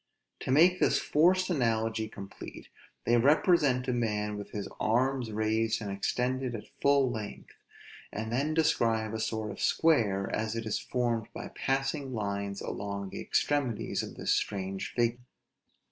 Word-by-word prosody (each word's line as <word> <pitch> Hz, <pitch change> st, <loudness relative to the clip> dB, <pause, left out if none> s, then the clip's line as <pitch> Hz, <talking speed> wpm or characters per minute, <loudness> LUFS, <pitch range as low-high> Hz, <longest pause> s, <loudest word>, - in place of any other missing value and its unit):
To -, -, -6 dB
make 175 Hz, +6 st, +5 dB
this -, -, +3 dB
forced 185 Hz, +4 st, +3 dB
analogy 115 Hz, -5 st, 0 dB
complete, 100 Hz, -2 st, -9 dB, 0.4 s
they 120 Hz, -, +4 dB
represent 140 Hz, -1 st, +4 dB
a 125 Hz, -, +1 dB
man 105 Hz, -3 st, -1 dB
with 100 Hz, 0 st, -7 dB
his 100 Hz, -2 st, -4 dB
arms 125 Hz, +2 st, +1 dB
raised 110 Hz, +1 st, +1 dB
and 105 Hz, -3 st, -4 dB
extended 125 Hz, +5 st, -1 dB
at 105 Hz, -, -6 dB, 0.2 s
full 140 Hz, -2 st, +4 dB
length, 110 Hz, -3 st, -7 dB, 0.6 s
and 110 Hz, +1 st, -4 dB
then 145 Hz, +6 st, 0 dB
describe 115 Hz, -9 st, +2 dB
a 110 Hz, -, -2 dB
sort 110 Hz, -1 st, -2 dB
of -, -, -8 dB
square, 110 Hz, -12 st, +3 dB
as 110 Hz, +1 st, -2 dB
it 115 Hz, -1 st, -3 dB
is 110 Hz, -, -1 dB
formed 120 Hz, -3 st, -1 dB
by -, -, -6 dB
passing 135 Hz, 0 st, -1 dB
lines 100 Hz, -2 st, -3 dB
along 100 Hz, -1 st, -4 dB
the -, -, -5 dB
extremities 135 Hz, -7 st, 0 dB
of -, -, -7 dB
this -, -, -1 dB
strange 95 Hz, -1 st, -1 dB
figure. 120 Hz, 0 st, +1 dB
115 Hz, 150 wpm, -30 LUFS, 105-135 Hz, 0.6 s, make